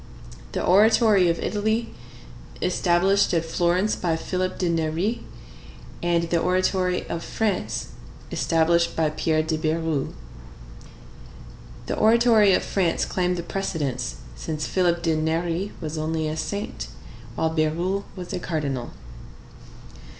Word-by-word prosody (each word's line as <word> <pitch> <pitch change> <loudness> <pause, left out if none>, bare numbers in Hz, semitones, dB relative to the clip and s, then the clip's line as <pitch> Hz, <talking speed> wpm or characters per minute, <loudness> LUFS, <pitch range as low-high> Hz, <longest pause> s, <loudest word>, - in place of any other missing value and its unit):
The - - -1
Oratory 205 -1 +5
of 170 - +1
Italy, 220 +2 -1 0.7
established 185 +2 +2
at 165 0 +1
Florence 175 +5 +1
by 170 -3 0
Philip 185 +3 -2
de 180 - 0
Neri, 170 +7 -1 0.8
and 170 -1 +2
the 170 0 +1
Oratory 185 +1 +1
of 170 - -4
France, 210 -4 -2 0.4
established 170 +1 +2
by 160 -2 +1
Pierre 155 0 +1
de 160 0 -2
Bérulle. 160 -2 -1 1.7
The - - -2
Oratory 225 -2 +5
of - - +2
France 180 -4 0
claimed 180 -1 0
the 170 - -3
precedence, 145 - -3 0.2
since 155 - -4
Philip 175 -2 +1
de 165 -2 +2
Neri 165 +4 -1
was 155 -1 -4
only 160 0 -1
a 155 - -2
saint, 200 +6 -4 0.5
while 160 - 0
Bérulle 170 +5 0
was 180 -2 -7
a - - -2
cardinal. 140 -8 -3
170 Hz, 120 wpm, -24 LUFS, 160-190 Hz, 1.7 s, Oratory